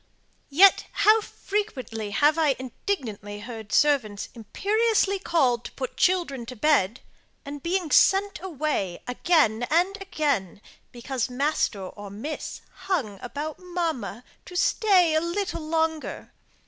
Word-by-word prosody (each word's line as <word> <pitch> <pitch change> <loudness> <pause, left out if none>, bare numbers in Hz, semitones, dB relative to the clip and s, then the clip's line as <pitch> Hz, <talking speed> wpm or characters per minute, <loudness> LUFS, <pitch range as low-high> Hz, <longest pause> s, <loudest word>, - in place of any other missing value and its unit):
Yet, 375 +8 +6
how 435 +1 +5
frequently 270 - -4
have 295 +9 +3
I 295 -4 +3
indignantly 225 - -5
heard 220 -1 -8
servants 250 -9 +2
imperiously 400 - +1
called 265 -10 +1
to - - -7
put 260 -1 -5
children 310 -10 +1
to 250 - -7
bed, 240 -4 +2 0.4
and 285 0 -7 0.3
sent 395 -2 +4
away 300 - -2
again 245 -4 +2
and 355 +5 +2
again, 290 - -1 0.3
because 250 +1 -3
master 250 -6 0
or 205 +2 -9
miss 230 +10 -6 0.3
hung 245 - -1
about 290 +5 -5
mamma, 335 - -3 0.2
to 360 - -10
stay 370 -3 +3
a 315 - +3
little 345 +1 -2
longer. 320 -1 -2
295 Hz, 120 wpm, -25 LUFS, 235-355 Hz, 0.4 s, Yet